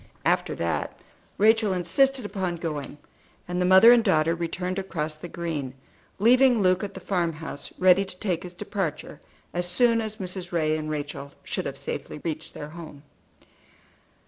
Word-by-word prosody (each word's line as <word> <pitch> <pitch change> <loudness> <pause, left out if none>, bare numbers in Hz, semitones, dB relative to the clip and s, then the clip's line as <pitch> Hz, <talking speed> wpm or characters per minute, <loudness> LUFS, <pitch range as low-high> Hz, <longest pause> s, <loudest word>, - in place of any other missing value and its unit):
After - - +1
that - - -2 0.4
Rachel 220 -1 +4
insisted 230 +9 +2
upon 190 -4 -2
going, 150 -4 -5 0.5
and 180 0 -2
the 180 - +2
mother 190 +5 +9
and 240 -1 +6
daughter 165 -5 +3
returned 180 +2 -3
across 160 -5 -3
the 155 +3 -8
green, 155 -7 -4 0.4
leaving 245 +3 +5
Luke 185 0 +3
at 200 -1 -5
the - - -6
farm 175 -3 -1
house, 155 -2 -7
ready 185 +1 +5
to 190 -2 -9
take 180 -4 -1
his 180 -1 -9
departure 175 -6 -4 0.3
as 175 0 -1
soon 230 +5 +3
as 215 -1 -5
Mrs. 185 -1 -5
Ray 155 -3 +1
and 155 0 -4
Rachel 145 -2 -5
should - - -3
have 140 0 -6
safely 140 +2 -5
reached 160 -1 -5
their 150 - -7
home. 155 -3 -10
180 Hz, 165 wpm, -26 LUFS, 155-195 Hz, 0.5 s, mother